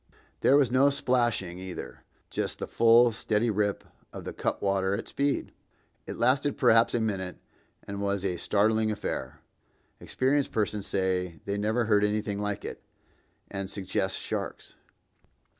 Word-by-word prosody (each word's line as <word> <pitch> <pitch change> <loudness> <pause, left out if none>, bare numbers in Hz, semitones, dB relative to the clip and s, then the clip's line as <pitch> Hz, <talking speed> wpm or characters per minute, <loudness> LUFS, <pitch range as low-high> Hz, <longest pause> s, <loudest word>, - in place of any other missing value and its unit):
There 140 - +5
was 135 -5 +3
no 135 +3 +5
splashing, 120 -10 0
either; 95 -1 -8 0.3
just - - -2
the - - -4
full, 115 +1 +5
steady 110 +1 0
rip 105 -1 0 0.3
of - - -8
the - - -6
cutwater 95 0 0
at - - -5
speed. 140 0 -1 0.6
It - - -5
lasted 140 +2 +2
perhaps 115 -2 +4
a - - +2
minute, 95 -5 -2 0.5
and 100 0 -6
was 100 -1 -1
a 90 -2 -1
startling 110 +4 +2
affair. 105 - -4 0.6
Experienced 135 +2 0
persons 105 -2 -1
say 90 -4 -1
they 100 - -2
never 110 +3 0
heard 105 -2 +3
anything 105 -1 0
like 105 -2 -3
it, - - -6 0.7
and 95 -1 -4
suggest 95 0 -2
sharks. - - -5
105 Hz, 140 wpm, -28 LUFS, 100-120 Hz, 0.7 s, There